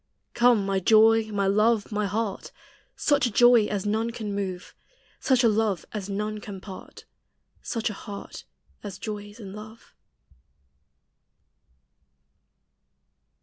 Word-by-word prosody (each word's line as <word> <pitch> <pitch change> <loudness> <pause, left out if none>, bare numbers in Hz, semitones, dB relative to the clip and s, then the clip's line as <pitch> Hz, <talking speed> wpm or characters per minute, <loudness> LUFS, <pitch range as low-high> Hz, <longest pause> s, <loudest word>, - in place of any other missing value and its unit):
Come 240 -4 +4
my 195 -1 0
joy, 220 +3 +5
my 200 -2 -1
love, 210 +2 +2
my 210 -1 -1
heart! 205 0 -3 0.4
Such 285 -4 +2
a - - -4
joy 240 0 +5
as 205 -2 -3
none 220 +2 0
can 220 -3 -5
move; 190 -2 -4 0.5
Such 260 -2 +2
a - - +6
love 215 -5 0
as 205 -2 -5
none 210 +2 -3
can 200 -2 -8
part; 190 0 -11 0.6
Such 230 -1 -3
a - - -6
heart 200 0 -9 0.4
as 200 -3 -7
joys 205 0 -7
in 195 -3 -9
love. 215 +2 -12
210 Hz, 125 wpm, -26 LUFS, 200-225 Hz, 0.6 s, a